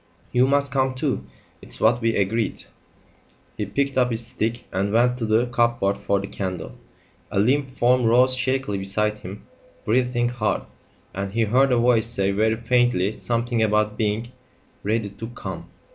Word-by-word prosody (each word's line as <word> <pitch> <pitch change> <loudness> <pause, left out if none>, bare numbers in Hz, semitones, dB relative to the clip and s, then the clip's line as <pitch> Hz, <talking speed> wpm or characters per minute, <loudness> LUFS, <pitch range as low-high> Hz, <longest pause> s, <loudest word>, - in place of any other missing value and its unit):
You 125 +1 +4
must 140 0 +1
come 130 -1 +1
too. 130 - -2 0.4
It's - - -5
what 115 +2 +3
we 115 0 +1
agreed." 110 +3 0 0.9
He 105 - -3
picked 140 +5 0
up 125 -1 +3
his 115 -1 -3
stick 115 0 -3
and 100 +2 -1
went 120 +2 +3
to 115 - -2
the 110 +3 +3
cupboard 120 -4 +1
for 100 0 0
the 100 - -4
candle. 95 -4 -5 0.5
A - - -3
limp 135 +6 +2
form 125 -1 +2
rose 125 +3 +5
shakily 130 -5 -1
beside 105 +2 -1
him 95 +2 -9 0.4
breathing 120 +1 +1
hard, 110 -4 -1 0.5
and 100 0 -4
he 115 0 +2
heard 130 +5 +3
a 125 - +3
voice 115 -2 +3
say 100 -4 0
very 110 +3 +2
faintly 115 -4 +1
something 120 0 -1
about 105 -1 +2
being 110 +2 -1 0.5
"ready 105 0 -1
to 110 +3 -7
come." 95 -7 -7
115 Hz, 165 wpm, -23 LUFS, 105-125 Hz, 0.9 s, rose